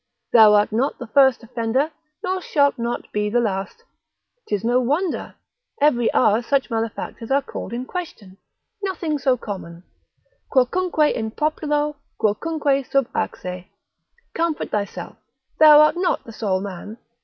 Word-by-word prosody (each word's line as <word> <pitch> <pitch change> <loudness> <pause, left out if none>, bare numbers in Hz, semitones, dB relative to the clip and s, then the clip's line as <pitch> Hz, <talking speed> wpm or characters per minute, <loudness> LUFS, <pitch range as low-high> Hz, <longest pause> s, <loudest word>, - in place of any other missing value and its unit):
thou 215 -3 +8
art 210 +1 +3
not 245 +6 0
the 245 - -7
first 265 +1 +4
offender, 235 +6 -1 0.3
nor 370 0 -1
shalt 285 -6 +1
not 235 +1 -4
be 210 0 -1
the 240 +3 +2
last, 200 - -3 0.6
'tis 205 -1 -2
no 240 +2 +2
wonder, 300 +8 -1 0.4
every 245 -6 +3
hour 215 -1 +3
such 270 +1 0
malefactors 225 0 -4
are 275 +1 +2
called - - -7
in 245 +2 -4
question, 215 - -7 0.4
nothing 335 -6 -2
so 260 -1 +2
common, 180 -6 -8 0.7
Quocunque 305 +4 +2
in 220 -1 -3
populo, 300 +2 -1 0.2
quocunque 275 +5 0
sub 275 0 +1
axe? 180 0 -4 0.7
Comfort 330 -2 -2
thyself, 200 -4 -4 0.4
thou 300 -1 +9
art 305 - +4
not 360 +1 0
the 230 - -11
sole 195 -4 -1
man. 200 +2 -7
245 Hz, 140 wpm, -22 LUFS, 215-300 Hz, 0.7 s, thou